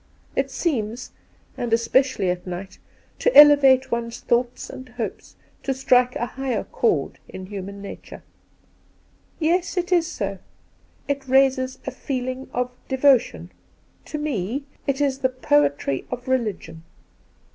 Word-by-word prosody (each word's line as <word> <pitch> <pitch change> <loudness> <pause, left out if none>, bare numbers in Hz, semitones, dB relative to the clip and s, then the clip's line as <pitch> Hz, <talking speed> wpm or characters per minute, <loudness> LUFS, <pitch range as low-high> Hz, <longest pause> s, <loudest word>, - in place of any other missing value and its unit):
It 270 0 0
seems 250 -5 -2 0.2
— - - -34
and 240 -2 -2
especially 230 -3 +2
at 180 +1 -6
night 180 +2 -7 0.2
— - - -35
to - - +3
elevate 285 -3 +8
one's 235 0 -3
thoughts 245 +1 0
and 255 0 -10
hopes, 240 -2 -6 0.3
to 270 - -2
strike 250 -2 +3
a 240 - -1
higher 265 0 -3
chord 460 - -1
in 185 - -8
human 200 0 -7
nature.' 200 - -10 0.6
' - - -37 0.3
Yes, 345 +3 +1
it 360 +1 -1
is 345 -2 +3
so. 200 - -4 0.7
It 280 -1 -2
raises 260 0 +3
a 270 - -3
feeling 255 0 -4
of 250 0 -2 0.2
devotion. 265 -1 +2 0.5
To 305 - -5
me, 275 -3 -2 0.2
it 275 0 0
is 275 -2 +1
the 260 -1 +2
poetry 145 - +1
of 250 0 -6
religion.' 210 -10 -2
255 Hz, 140 wpm, -23 LUFS, 225-275 Hz, 0.7 s, elevate